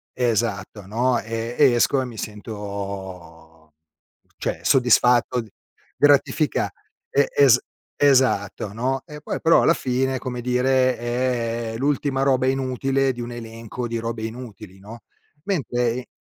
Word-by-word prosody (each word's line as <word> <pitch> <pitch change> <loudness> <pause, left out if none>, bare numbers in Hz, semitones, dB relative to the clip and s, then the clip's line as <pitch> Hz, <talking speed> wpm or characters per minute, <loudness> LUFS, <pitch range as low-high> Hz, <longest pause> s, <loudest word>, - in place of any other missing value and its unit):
Esatto, 110 -4 -1
no, 120 +5 +1
ehm, 115 +1 -4
e 140 -4 +6
esco, 130 +3 +2
e - - -3
mi 115 -3 -9
sento 95 -7 -8 0.6
cioè, - - -3
soddisfatto, 125 -1 +3 0.5
gratifica 145 +1 +2 0.4
e 140 - +2
es 130 -4 +6 0.4
esatto, 125 -7 +2
no, 130 +4 -1
e 150 -2 -10
poi - - -4
però, 165 - +5
alla 165 - +5
fine, 130 -1 -1
come 125 -1 -5
dire, 130 +1 +2
è 120 -2 -2
l'ultima 140 -1 0
roba 130 -2 +2
inutile, 135 +1 0
di 120 - -7
un 120 - -6
elenco 115 +1 -6
di 115 - -3
robe 115 0 -4
inutili, 110 -4 -8
no. 110 +4 -11 0.5
Mentre 125 - -1
120 Hz, 125 wpm, -23 LUFS, 110-130 Hz, 0.6 s, e